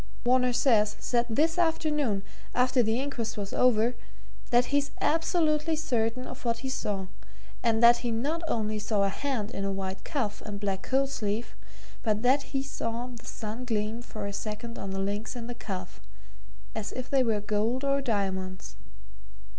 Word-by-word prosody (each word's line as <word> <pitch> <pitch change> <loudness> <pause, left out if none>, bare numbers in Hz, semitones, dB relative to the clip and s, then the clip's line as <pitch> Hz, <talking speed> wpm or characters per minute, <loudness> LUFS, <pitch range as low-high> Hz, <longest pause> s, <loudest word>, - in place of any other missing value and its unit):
Varner 250 0 +4
says 215 -4 +3
said 240 -1 +1
this 320 +8 +2
afternoon, 300 - +1 0.3
after 250 0 +4
the 225 +1 +2
inquest 240 -6 -3
was 200 -1 -4
over 240 -1 +4 0.6
that 245 0 +5
he's 285 0 +3
absolutely 320 -1 +2
certain 255 -5 0
of - - -8
what 230 -1 0
he - - -1
saw, 205 -7 -2 0.6
and 230 -1 +2
that 240 0 +9
he 240 - -2
not 280 +9 0
only 215 -4 0
saw 210 -1 +1
a 195 - +3
hand 230 -2 -2
in 195 - -3
a 195 - 0
white 190 -1 -4
cuff 245 -10 -2
and 205 -2 -5
black 195 -2 -1
coat 270 +4 +1
sleeve, 220 -3 -2 0.5
but 215 -1 0
that 265 +3 +5
he 270 -1 -2
saw 240 -3 -3
the 235 - -11
sun 225 +2 -5
gleam 220 -1 -1
for 215 -3 -6
a 200 - -3
second 220 +3 -5
on 195 - -4
the 190 - -3
links 205 +5 -2
in 240 -2 -5
the 245 - -4
cuff, 190 -6 -6 0.7
as 210 -1 -4
if 255 0 -5
they 270 0 +3
were 225 -4 +2
gold 215 +5 0
or 275 0 +2
diamonds. 190 - -2
230 Hz, 175 wpm, -29 LUFS, 210-260 Hz, 0.7 s, that